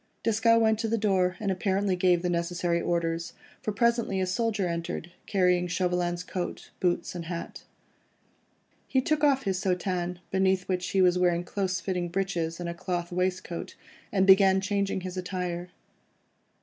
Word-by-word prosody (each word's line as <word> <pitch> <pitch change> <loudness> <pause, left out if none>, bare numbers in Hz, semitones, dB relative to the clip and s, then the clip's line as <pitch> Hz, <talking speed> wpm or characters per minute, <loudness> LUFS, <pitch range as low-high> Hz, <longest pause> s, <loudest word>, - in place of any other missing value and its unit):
Desgas 230 +1 +4
went 220 -1 +3
to 225 - -1
the 230 +1 +1
door, 190 -4 +1
and 205 -2 -1
apparently 190 0 0
gave 180 -1 +3
the 180 - 0
necessary 170 0 0
orders, 170 0 -1 0.3
for 215 - -2
presently 235 -2 +1
a 185 - +1
soldier 205 +1 0
entered, 170 0 -4 0.2
carrying 180 -2 +2
Chauvelin's 180 -1 0
coat, 180 -1 -5
boots, 175 -1 0
and 175 -2 -6
hat. 170 0 -6 1.2
He 265 - +2
took 300 +3 0
off 275 -2 +4
his 190 -2 -1
soutane, 180 -1 -1
beneath 190 -1 +2
which 185 -1 -1
he 190 -1 +3
was 180 0 +4
wearing 175 -1 +2
close 185 0 -2
fitting 180 -2 -2
breeches 170 -3 -2
and 175 - -4
a 170 - -3
cloth 175 0 -3
waistcoat, 180 -1 -2 0.4
and 190 -2 +3
began 190 0 +6
changing 195 0 -1
his 185 0 -6
attire. 180 -1 -3
185 Hz, 160 wpm, -28 LUFS, 175-195 Hz, 1.2 s, began